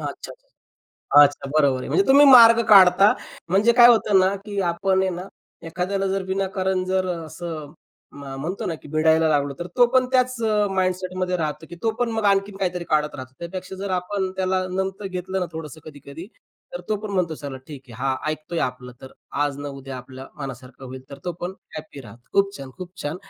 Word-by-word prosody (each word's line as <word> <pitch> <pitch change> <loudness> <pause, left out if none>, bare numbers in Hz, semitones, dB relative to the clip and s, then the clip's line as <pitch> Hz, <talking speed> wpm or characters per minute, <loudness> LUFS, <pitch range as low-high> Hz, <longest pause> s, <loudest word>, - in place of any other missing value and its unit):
अच्छा. - - -7 0.9
अच्छा, 145 -1 +1
बरोबर 140 -3 +2
आहे. - - -7
म्हणजे 390 - +2
तुम्ही 280 +2 +7
मार्ग 235 -3 +8
काढता. 195 0 +7 0.4
म्हणजे 205 +6 +3
काय 240 0 +8
होतं 215 -4 +4
ना 190 +1 +2
की 205 -2 -3
आपण 190 +2 +1
आहे 190 - 0
ना, 175 +1 -5 0.4
एखाद्याला 185 +4 -2
जर 195 0 -1
विनाकारण 190 -1 -1
जर 185 0 0
असं, 160 -2 -7 0.4
म 140 0 -11 0.2
म्हणतो 175 +7 -4
ना, 165 - -2
की 150 - -13
भिडायला 160 +1 +3
लागलो, 145 -2 0
तर 175 - -5
तो 245 -1 +6
पण 255 -1 +4
त्याच 255 0 +2
अ, 210 -2 +2
माइंडसेटमध्ये 185 0 -1
राहतो 155 -1 -4
की 175 - -9
तो 225 - +2
पण 245 -1 0
मग 220 -1 -2
आणखीन 195 0 +1
काहीतरी 180 -2 -2
काढत 150 -1 +1
राहतो. 130 -2 -9
त्यापेक्षा 185 +2 -7
जर 195 +1 -5
आपण 185 +1 -2
त्याला 185 0 0
नमतं 190 +1 -3
घेतलं 185 +1 -3
ना 180 - -1
थोडंसं 160 -1 -8
कधी-कधी, 145 +2 -11 0.5
तर - - -5
तो 215 - +1
पण 215 - -5
म्हणतो 170 -4 0
चला 140 -3 -7
ठीक 140 -3 -10
आहे. 115 - -12
हा 135 -1 0
ऐकतोय 155 +2 -5
आपलं. 125 0 -11
तर 130 - -11 0.3
आज 145 -1 -3
ना 145 0 -5
उद्या 135 -1 -8
आपल्या 130 +1 -11
मनासारखं 135 -1 -9
होईल. 130 0 -9
तर 140 - -9
तो 175 - -2
पण 175 +2 -4 0.2
हॅपी 155 -2 -9
राहतो. 120 -1 -14
खूप 200 0 +1
छान, 135 -1 -9
खूप 180 -1 -9
छान. 145 +3 -3
180 Hz, 200 wpm, -22 LUFS, 145-195 Hz, 0.9 s, मार्ग